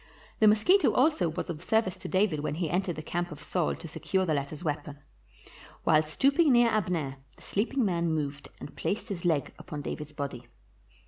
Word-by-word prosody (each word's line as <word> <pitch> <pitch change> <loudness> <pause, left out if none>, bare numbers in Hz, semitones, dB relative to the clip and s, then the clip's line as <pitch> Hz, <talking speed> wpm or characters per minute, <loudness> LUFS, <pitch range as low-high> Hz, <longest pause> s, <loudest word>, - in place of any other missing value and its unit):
The 215 - +6
mosquito 270 - +5
also 280 - +3
was 160 - -4
of 160 0 -8
service 220 -3 +1
to 185 0 -7
David 185 -4 +1
when 150 0 -2
he 165 -2 -2
entered 180 -1 0
the 155 - -6
camp 175 +2 -3
of 150 0 -9
Saul 165 +2 0
to - - -9
secure 190 +4 -1
the 160 - +1
latter 140 +1 -2
's 155 - -9
weapon. 145 -2 -3 0.9
While 155 -1 +5
stooping 275 - +3
near 240 -1 +5
Abner, 175 -10 -1 0.2
the - - -18
sleeping 240 +5 0
man 170 -3 0
moved 145 -2 -3
and - - -9
placed 210 +3 -3
his 185 -3 -5
leg 160 -5 +1
upon 150 -5 -7
David's 150 0 -5
body. 140 -5 -6
170 Hz, 195 wpm, -29 LUFS, 150-205 Hz, 0.9 s, The